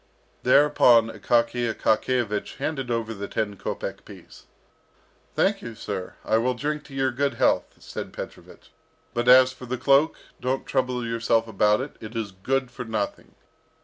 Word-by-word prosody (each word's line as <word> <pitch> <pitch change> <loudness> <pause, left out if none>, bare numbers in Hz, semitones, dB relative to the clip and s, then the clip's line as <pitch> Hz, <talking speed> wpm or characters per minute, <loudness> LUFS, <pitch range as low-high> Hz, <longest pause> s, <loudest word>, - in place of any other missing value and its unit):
Thereupon 125 -4 +5
Akaky 115 +2 +1
Akakiyevich 110 -1 0
handed 135 -5 -3
over 115 -1 -1
the 100 -1 -6
ten 105 -2 -2
kopek - - -5
piece. - - -14 0.9
"Thank - - +2
you, 115 -1 -7
sir. 95 -4 -5
I 110 - +3
will 125 +2 0
drink 150 +4 -3
your 135 -1 0
good 140 +3 -1
health," - - +1
said - - -7
Petrovich. - - -10 0.4
"But 120 0 -1
as 130 +1 +8
for 130 -1 -11
the 130 +1 -2
cloak, 140 +5 +3 0.2
don't 130 +1 -2
trouble 125 -2 -1
yourself 115 0 +1
about 105 +1 +2
it; 140 - -7
it 110 +1 -9
is 110 -3 -3
good 130 +7 -2
for 125 - -6
nothing. 110 -3 -4
120 Hz, 150 wpm, -25 LUFS, 110-130 Hz, 0.9 s, as